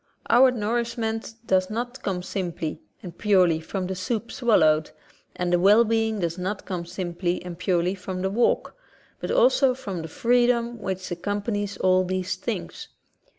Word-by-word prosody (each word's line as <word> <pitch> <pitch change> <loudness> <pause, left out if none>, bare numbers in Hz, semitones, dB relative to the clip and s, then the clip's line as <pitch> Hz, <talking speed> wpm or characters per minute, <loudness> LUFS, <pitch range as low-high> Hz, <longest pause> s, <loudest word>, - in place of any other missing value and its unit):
Our 255 +3 +7
nourish 235 0 -1
ment 225 0 -3
does 185 -2 +2
not 245 +4 -4
come 180 -3 -2
simply 170 -5 -4 0.2
and 175 -3 -8
purely 185 -6 +3
from 185 +3 -4
the 190 - -3
soup 225 +4 -3
swallowed, 155 - +3 0.5
and 180 0 -1
the 175 - +4
well 205 +5 +6
being 225 -2 0
does 170 +1 -2
not 190 +3 -3
come 175 -3 -4
simply 175 0 -2
and 175 -1 -6
purely 180 0 0
from 185 -1 -5
the 190 - 0
walk, 235 +4 +1 0.4
but - - -5
also 485 - +4
from 195 -9 -5
the 160 - -6
freedom 240 +4 +1
which 190 -2 -4
accompanies 205 +3 -2
all 185 0 +3
these 185 0 -2
things. - - -5
195 Hz, 160 wpm, -25 LUFS, 180-230 Hz, 0.5 s, Our